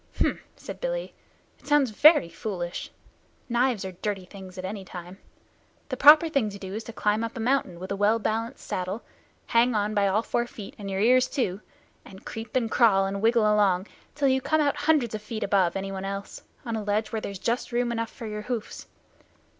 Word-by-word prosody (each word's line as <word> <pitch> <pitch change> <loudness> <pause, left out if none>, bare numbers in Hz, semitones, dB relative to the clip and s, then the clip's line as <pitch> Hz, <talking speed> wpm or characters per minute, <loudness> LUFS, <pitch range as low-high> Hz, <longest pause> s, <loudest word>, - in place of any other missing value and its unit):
"H'm!" - - +1 0.2
said - - -9
Billy. - - -3 0.5
"It - - -20
sounds 290 -5 +3
very 295 - +6
foolish. 175 -1 -5 0.6
Knives 240 -4 +1
are 190 - -4
dirty 195 +1 -4
things 190 -1 -11
at 185 - -5
any 195 +1 -5
time. 180 0 -10 0.7
The 260 - -2
proper 300 +5 +8
thing 275 -9 0
to 200 - -8
do 190 -1 -7
is 220 +2 -4
to - - -7
climb 215 0 0
up 230 +2 -5
a - - -4
mountain 225 -7 0
with 185 +2 -7
a - - 0
well 205 +3 +3
balanced 225 +3 -3
saddle, 185 +5 -3 0.4
hang 235 +1 +3
on 210 0 0
by 205 -1 +2
all 205 +4 +1
four 240 0 -1
feet 210 -4 -9
and 200 -1 -6
your 195 0 -1
ears 255 +3 +5
too, 210 -8 -2 0.4
and 190 0 -14
creep 225 +1 -7
and 230 -3 +1
crawl 200 -5 +4
and 195 0 -3
wriggle 230 0 +4
along, 205 -3 +3 0.3
till 285 -2 +2
you 265 0 +2
come 315 +4 +1
out 290 -2 +2
hundreds 290 -6 +2
of 215 - -4
feet 215 +1 -5
above 190 -3 +2
anyone 195 0 -4
else 195 0 -5 0.2
on 230 -2 -2
a 220 - -2
ledge 210 +1 -1
where 220 - -2
there's 200 -2 -5
just 235 +7 -2
room 240 0 0
enough 230 -1 -2
for 230 - -9
your 210 -1 -4
hoofs. 230 -1 -5
215 Hz, 210 wpm, -26 LUFS, 195-240 Hz, 0.7 s, proper